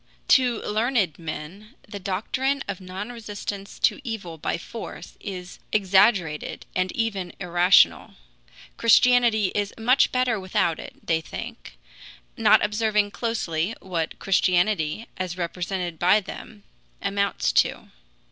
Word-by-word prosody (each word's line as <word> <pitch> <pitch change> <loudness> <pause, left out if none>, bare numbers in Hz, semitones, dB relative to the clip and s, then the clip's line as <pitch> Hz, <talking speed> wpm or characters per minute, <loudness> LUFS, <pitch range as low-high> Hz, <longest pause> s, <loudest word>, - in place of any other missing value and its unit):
To 250 -4 +4
learned 215 - 0
men 175 - -8
the 205 -1 -7
doctrine 255 +9 -1
of 200 -1 -5
non 190 +5 -6
resistance 205 -3 -7
to - - +2
evil 195 - -6
by - - -1
force 225 +6 -9
is 180 -3 -7
exaggerated 190 -5 +2
and 185 0 0
even 200 -6 -2
irrational. 180 0 +4 0.6
Christianity 230 -3 +4
is 205 -1 -1
much 250 +4 +3
better 250 -4 +1
without 185 -3 0
it, - - -11
they 160 -1 +1
think, - - -8 0.6
not - - +5
observing 210 -1 +1
closely 210 -5 -2
what 170 -4 -3
Christianity, 185 0 +1
as 185 -1 -4
represented 175 -1 -3
by 185 +4 +5
them, 205 +1 -10 0.4
amounts 200 0 0
to. - - +1
200 Hz, 120 wpm, -24 LUFS, 180-225 Hz, 0.6 s, not